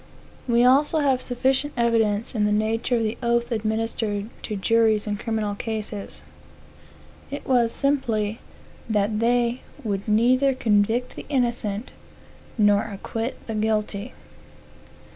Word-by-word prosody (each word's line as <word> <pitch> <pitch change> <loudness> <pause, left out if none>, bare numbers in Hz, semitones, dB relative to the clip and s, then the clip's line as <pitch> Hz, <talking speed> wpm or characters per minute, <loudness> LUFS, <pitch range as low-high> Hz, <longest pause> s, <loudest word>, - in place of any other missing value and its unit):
We 240 0 +4
also 280 +5 +4
have 265 -3 +2
sufficient 265 +4 0
evidence 230 -2 +1
of 215 -3 0
the 210 - +1
nature 220 +3 +1
of 230 - +1
the 215 +1 -2
oath 235 0 +1
administered 220 -1 -2
to 215 - -4
jurors 220 +2 +2
in 210 -1 -1
criminal 220 -2 -2
cases. 210 -1 -4 1.1
It 285 - -6
was 240 -3 +3
simply, 230 -7 0 0.5
that 210 0 +1
they 240 +1 +1 0.2
would 200 -2 -3
neither 255 +5 +3
convict 225 +1 +1
the - - -9
innocent, 240 -5 -1 0.7
nor 205 -1 +4
acquit 225 +3 -5
the 225 - -4
guilty. 215 +1 -1
225 Hz, 125 wpm, -24 LUFS, 210-245 Hz, 1.1 s, We